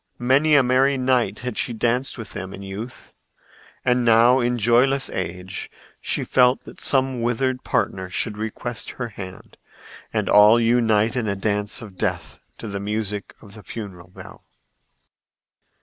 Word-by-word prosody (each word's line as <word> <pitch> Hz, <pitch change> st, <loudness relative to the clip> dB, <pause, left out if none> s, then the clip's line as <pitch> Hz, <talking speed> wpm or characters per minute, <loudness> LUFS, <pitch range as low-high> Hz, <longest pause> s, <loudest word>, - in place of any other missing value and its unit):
Many 140 Hz, +5 st, +3 dB
a 140 Hz, -, +6 dB
merry 130 Hz, +2 st, +3 dB
night 130 Hz, -1 st, +1 dB
had 125 Hz, -2 st, -4 dB
she 120 Hz, -, -1 dB
danced 120 Hz, +4 st, 0 dB
with 115 Hz, -3 st, -8 dB
them 95 Hz, -1 st, -6 dB
in 100 Hz, -, -10 dB
youth, 105 Hz, +6 st, -8 dB, 0.7 s
and 125 Hz, 0 st, +2 dB
now 120 Hz, +2 st, +5 dB
in 120 Hz, 0 st, 0 dB
joyless 125 Hz, +5 st, +2 dB
age 90 Hz, +1 st, -5 dB, 0.3 s
she -, -, -1 dB
felt 125 Hz, 0 st, +3 dB
that -, -, -12 dB
some 130 Hz, -2 st, +1 dB
withered 125 Hz, +2 st, -1 dB
partner 95 Hz, -1 st, -1 dB
should 105 Hz, +3 st, -2 dB
request 110 Hz, +2 st, -4 dB
her 125 Hz, -2 st, -4 dB
hand 95 Hz, -3 st, -10 dB, 0.5 s
and -, -, -1 dB
all 105 Hz, +3 st, +7 dB
unite 115 Hz, -1 st, +2 dB
in 120 Hz, -4 st, -1 dB
a 100 Hz, -, -1 dB
dance 105 Hz, +2 st, -2 dB
of 95 Hz, -5 st, -12 dB
death -, -, -3 dB, 0.2 s
to 115 Hz, -, -8 dB
the 100 Hz, -1 st, -4 dB
music 105 Hz, 0 st, -4 dB
of 100 Hz, -2 st, -14 dB
the 110 Hz, -, -11 dB
funeral 95 Hz, -6 st, -8 dB
bell. 90 Hz, -, -13 dB
115 Hz, 155 wpm, -22 LUFS, 105-125 Hz, 0.7 s, all